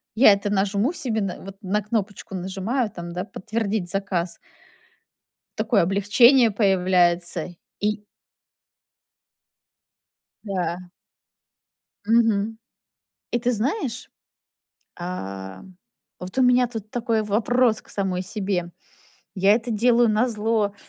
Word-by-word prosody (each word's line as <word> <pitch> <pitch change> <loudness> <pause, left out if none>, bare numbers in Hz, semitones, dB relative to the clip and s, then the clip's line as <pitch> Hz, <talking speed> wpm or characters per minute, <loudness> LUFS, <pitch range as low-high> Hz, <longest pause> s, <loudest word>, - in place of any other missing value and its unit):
Я 215 -3 +7
это 200 +1 -2
нажму 200 - +1
себе 225 -9 -2
на 195 -2 -3
вот, 195 0 -9
на 205 +2 0
кнопочку 205 -2 -3
нажимаю, 195 +6 -2
там, 170 0 -7
да, 180 +1 -3
подтвердить 215 -3 -3
заказ. 185 -3 -2 1.2
Такое 210 -7 +2
облегчение 220 +6 +5
появляется 180 -4 +1 0.2
и 210 0 -1 2.4
Да. 180 -2 -3 1.2
Мгм. 225 -1 +2 0.7
И 240 - +1
ты 245 +1 0
знаешь, 250 - -2 0.9
ам, 95 - -7 0.4
вот 180 +7 -8
у - - +4
меня 250 0 +4
тут 220 -3 -7
такой 230 -2 0
вопрос 225 +2 +2
к - - -22
самой 190 -2 -2
себе: 190 -3 -3 0.6
я 195 +2 +4
это 235 +2 0
делаю 235 +2 +3
назло 215 -2 +1
205 Hz, 105 wpm, -23 LUFS, 185-230 Hz, 2.4 s, Я